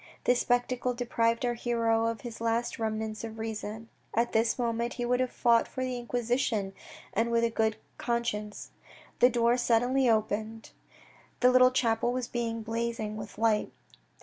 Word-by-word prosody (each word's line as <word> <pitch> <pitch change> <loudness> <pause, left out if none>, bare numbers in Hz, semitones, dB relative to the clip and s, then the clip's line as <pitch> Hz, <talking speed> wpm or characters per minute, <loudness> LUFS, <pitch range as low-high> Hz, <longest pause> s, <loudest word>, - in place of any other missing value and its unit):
This 245 0 +3
spectacle 245 0 0
deprived 235 0 0
our 240 - +1
hero 230 -1 +1
of 230 -2 -3
his 235 -2 -8
last 230 +1 -1
remnants 220 0 -3
of 225 -1 -6
reason. 220 0 -5 0.3
At 235 +1 +2
this 225 +1 +2
moment 235 -1 -1
he 245 - -3
would 250 +1 +1
have 255 -1 +1
fought 235 -2 +3
for 260 - -4
the 255 -1 -2
Inquisition, 240 -4 -1 0.4
and 225 +2 +1
with 235 0 +2
a 230 - +2
good 220 -1 +1 0.2
conscience. 225 -3 -3 0.5
The 245 - +7
door 240 0 +2
suddenly 245 +2 +2
opened. 220 0 -1 0.7
The 250 0 +6
little 255 0 +7
chapel 240 -2 +1
was 250 -1 -2
blazing 230 -1 -3
with 210 -1 -8
light. 220 -1 +1
230 Hz, 155 wpm, -29 LUFS, 225-245 Hz, 0.7 s, The